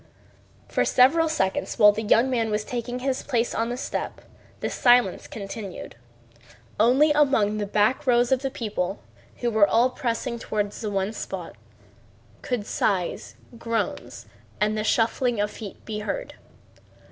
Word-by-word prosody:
For - - +1
several 315 +6 +4
seconds 190 -12 -1
while 210 -2 +8
the 210 +2 -4
young 225 +3 +3
man 235 -4 0
was 210 0 -1
taking 245 +1 -4
his 260 +1 -2
place 235 -1 -1
on 230 +1 -1
the 245 - -3
step 265 - -4 0.4
the - - -2
silence 245 -6 +3
continued. 200 -1 -7 0.8
Only 260 +7 +5
among 265 -8 +2
the 205 - -2
back 215 +8 +1
rows 240 0 +3
of 260 -1 +3
the 270 - -1
people, 210 -7 -3 0.4
who 240 -1 0
were 215 -2 +5
all 240 +4 +3
pressing 235 -1 -3
toward 210 -2 -2
the 215 - -5
one 195 +1 -1
spot, - - -6 0.9
could 245 -5 -3
sighs, 185 -5 -1 0.2
groans, 230 -1 -3 0.3
and 210 +1 +1
the 215 - -1
shuffling 230 +1 +1
of 205 0 0
feet 210 -4 -10
be 215 -1 -4
heard. - - -4
230 Hz, 150 wpm, -25 LUFS, 210-250 Hz, 0.9 s, while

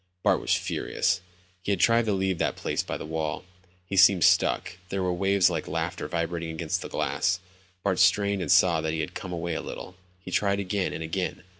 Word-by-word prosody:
Bart - - +3
was - - +2
furious. 95 -2 -1 0.4
He 100 +2 0
tried 115 +5 +3
to 110 - +1
leave 95 -2 0
the - - +1
place - - -2
by - - -4
the - - -7
wall. 80 0 -3 0.4
He 95 - -4
seemed 95 -2 +6
stuck. 90 - +2
There 95 0 -2
were 90 -1 0
waves 95 +1 +3
like - - -3
laughter - - -3
vibrating 85 0 -2
against 80 0 -2
the - - -7
glass. 95 +1 0 0.4
Bart 95 -2 0
strained 100 +1 +3
and 90 - -1
saw 90 -3 +5
that 80 0 -2
he 80 - -1
had 75 - -5
come 95 - -6
away 85 -1 -3
a - - -3
little. 90 - -8 0.3
He 90 0 -10
tried 100 +1 +1
again 100 0 -1
and 80 - -5
again. 90 +3 -3
90 Hz, 205 wpm, -27 LUFS, 85-95 Hz, 0.4 s, seemed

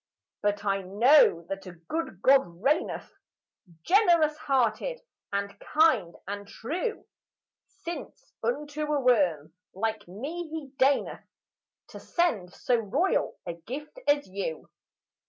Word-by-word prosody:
But 205 0 0
I 195 -1 +1
know 205 - +5
that 195 0 -6
a 180 - -8
good 185 - -5
God 200 -10 +4
reigneth, 300 +6 0 0.7
Generous 345 - +4
hearted 275 - 0 0.3
and 200 0 -2
kind 260 - +3
and 200 0 -5
true; 345 - -4 0.8
Since 345 +8 -7
unto 300 -8 -2
a 295 - +2
worm 185 - +2 0.2
like 220 0 -2
me 300 - -6
he 305 -4 -6
deigneth 275 +1 +1 0.6
To - - -9
send 230 - 0
so 245 +5 +1
royal 245 - 0
a 170 - -3
gift 270 - -8
as 290 0 +3
you. 185 -5 -5
250 Hz, 120 wpm, -28 LUFS, 195-305 Hz, 0.8 s, know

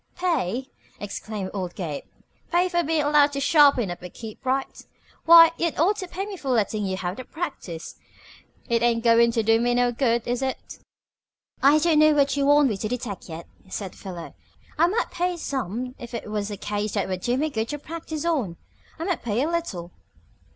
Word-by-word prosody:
"Pay!" 265 - -1 0.3
exclaimed 205 -1 -5
old 185 -3 -4
Gabe. 155 -6 -5 0.5
"Pay 355 +2 +3
for 345 -1 +1
bein' 315 -2 0
allowed 290 -1 +4
to 280 - -2
sharpen 280 - +4
up 175 - -7
and 180 -1 -9
keep 220 -2 -9
bright? 265 +1 -2 0.4
Why, 330 0 +9
you'd 335 -2 -1
ought 385 +7 +3
to 370 - -5
pay 380 +3 -4
me 405 -2 -7
for 275 - -6
lettin' 215 -4 +1
you 190 0 -2
have 180 0 -4
the 255 - -6
practice. 255 - -6 0.7
It 235 -2 +1
ain't 235 -1 +2
goin' 235 0 +5
to 230 -2 +1
do 225 +1 +4
me 245 0 +2
no 245 0 +3
good, 235 -2 0
is 245 +1 -1
it?" 265 -1 -4 0.8
"I 285 +3 +6
don't 315 0 +3
know 310 0 +6
what 280 -2 +3
you 280 -1 +1
want 290 -1 +5
me 210 - -2
to 215 - -3
detect 225 -6 -5
yet," 165 +1 -7 0.2
said 190 -1 -5
Philo. 175 -4 -8 0.4
"I 335 +3 +4
might 445 +6 -1
pay 355 0 -1
some 250 - -3
if 240 0 -8
it 215 -2 -6
was 210 -1 -2
a 205 - -5
case 205 0 -3
that - - 0
would 185 -1 -3
do 245 +5 0
me 305 +2 0
good 220 -2 -2
to 295 - -3
practice 315 +1 -6
on. 255 - -1 0.4
I 325 - -5
might 360 -1 -1
pay 235 +2 0
a - - 0
little." 220 - -3
250 Hz, 205 wpm, -24 LUFS, 210-310 Hz, 0.8 s, Why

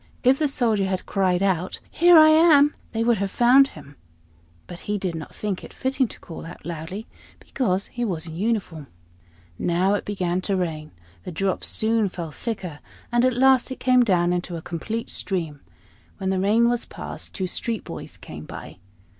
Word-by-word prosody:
If 260 +2 +4
the 305 - +2
Soldier 225 -8 +1
had 185 -1 -2
cried 185 -2 +1
out 185 -2 0
"Here 345 0 +6
I 310 0 +9
am!" 310 -2 +6 0.2
they 225 -1 -1
would 230 -3 +2
have 200 0 -1
found 250 +6 +5
him; 145 - -14 0.7
but 175 - -9
he 210 - +1
did 185 -3 -3
not 160 -2 -8
think 205 -3 -3
it - - -10
fitting 260 0 0
to - - -11
call 165 - -9
out 165 -2 -11
loudly, 170 +6 -6 0.3
because 200 -7 -1
he 240 - -5
was 175 -8 -2
in 160 -2 -8
uniform. 185 -7 -2 0.7
Now 180 +3 +2
it 205 - -1
began 185 -3 -1
to 195 +1 -1
rain; 160 -4 -3 0.3
the - - -6
drops 185 +3 -1
soon 220 -2 +1
fell 170 -3 -6
thicker, 185 -7 -5 0.3
and 240 0 +3
at 255 -1 +2
last 265 0 +4
it 260 - -6
came 255 0 +4
down 180 -6 +2
into 175 0 -3
a 165 - -5
complete 220 +7 -4
stream. 165 -7 -3 0.6
When 190 -1 -1
the 190 - 0
rain 215 +5 +3
was 240 0 0
past, - - -8
two 190 - -2
street 225 +5 -3
boys - - -8
came - - -10
by. - - -10
195 Hz, 190 wpm, -24 LUFS, 175-240 Hz, 0.7 s, I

